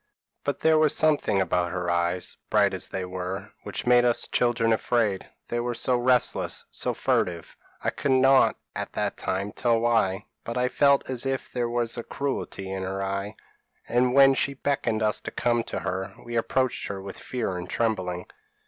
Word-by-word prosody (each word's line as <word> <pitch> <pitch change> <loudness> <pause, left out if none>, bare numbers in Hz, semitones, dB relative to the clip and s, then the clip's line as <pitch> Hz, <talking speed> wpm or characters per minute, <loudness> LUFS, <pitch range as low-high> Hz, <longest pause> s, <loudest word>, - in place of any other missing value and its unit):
But 145 - -2
there 160 -1 +5
was 155 -2 +3
something 150 -10 +2
about 90 -2 +1
her 90 -1 -3
eyes, 85 +1 -1
bright - - +3
as - - -4
they 95 -1 -4
were, 90 +1 -5
which - - -5
made 120 0 +5
us 120 -1 +2
children 120 -2 +2
afraid; 110 -4 0 0.2
they 120 - -1
were 120 0 -2
so 125 +2 +1
restless, 125 0 +2
so - - -2
furtive; 85 -2 -1 0.3
I - - +1
could 140 - 0
not 135 +1 +5 0.2
at - - -4
that - - -1
time 100 +2 -2
tell 115 +1 +1
why, 115 -5 +1 0.2
but 115 +1 -4
I 125 0 +2
felt 140 +1 +3
as 130 0 -2
if 135 0 -3
there 120 -2 -1
was 120 0 -1
cruelty 130 -8 -3
in 95 0 -3
her 95 +1 -3
eye; 100 +2 -3 0.5
and 125 +1 +2
when 135 0 +8
she 140 +1 0
beckoned 135 -6 0
us 105 0 +1
to - - -5
come 120 -1 0
to - - -4
her, 95 +1 -3
we 120 0 -5
approached 130 +3 0
her 100 - -5
with 95 0 -8
fear 120 -7 -3
and 90 0 -6
trembling. 95 -6 -1
115 Hz, 185 wpm, -26 LUFS, 95-125 Hz, 0.5 s, when